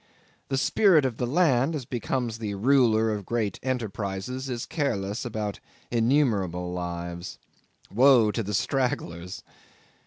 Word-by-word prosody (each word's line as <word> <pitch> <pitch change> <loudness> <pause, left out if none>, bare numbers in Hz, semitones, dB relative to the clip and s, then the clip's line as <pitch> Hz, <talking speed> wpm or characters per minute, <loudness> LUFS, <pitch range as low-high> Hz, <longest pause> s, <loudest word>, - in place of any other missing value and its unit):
The 135 - 0
spirit 165 0 +4
of 125 -4 -2
the 125 - -1
land, 145 -1 +2
as 135 -5 -4
becomes 120 -1 -3
the 105 -3 -3
ruler 115 -1 +3
of 105 -1 -3
great 110 -1 -2
enterprises, 120 0 -3
is 120 -2 -3
careless 110 -9 -2
of 120 - -6 0.6
innumerable 110 - +1
lives. 85 0 -5 0.6
Woe 120 -2 +6
to 115 - -2
the 105 -1 -3
stragglers! 90 -8 -2
115 Hz, 125 wpm, -26 LUFS, 100-130 Hz, 0.6 s, Woe